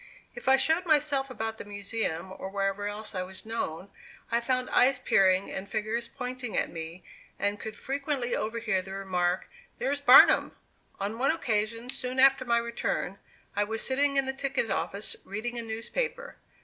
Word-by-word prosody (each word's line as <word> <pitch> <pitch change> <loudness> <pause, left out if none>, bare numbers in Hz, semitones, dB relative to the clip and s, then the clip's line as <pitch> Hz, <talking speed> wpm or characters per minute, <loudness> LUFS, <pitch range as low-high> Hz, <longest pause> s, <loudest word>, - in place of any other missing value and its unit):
If - - -10
I 265 - +8
showed 320 +6 +2
myself 290 -3 +2
about 225 -2 -4
the - - -5
Museum 200 -3 -3
or 190 - -6
wherever 195 +1 -1
else 210 +1 -4
I 185 - -2
was 185 +2 -7
known, 200 -5 -4 0.4
I 235 +1 +2
found 255 +1 0
eyes 260 +1 +5
peering 190 -5 +3
and 195 +1 -5
fingers 220 +3 -2
pointing 250 -3 -5
at - - 0
me, 165 +2 -7 0.3
and 205 +1 -1
could 220 0 -6
frequently 275 -3 -1
overhear 220 -3 -1
the 190 +1 -9
remark, 185 -2 -1 0.3
"There's 285 +1 -1
Barnum." 265 -1 +7 0.4
On 205 +4 -3
one 270 - +2
occasion 230 -4 -1
soon 255 0 -4
after 270 -1 +6
my 235 -1 +3
return, 235 -4 -2 0.4
I 205 - +2
was 220 +2 -3
sitting 280 +1 +2
in 275 - +4
the 265 - -2
ticket 270 -5 -1
office 200 +1 -1
reading 235 +4 -4
a - - -2
newspaper. 470 - -4
230 Hz, 170 wpm, -28 LUFS, 200-265 Hz, 0.4 s, I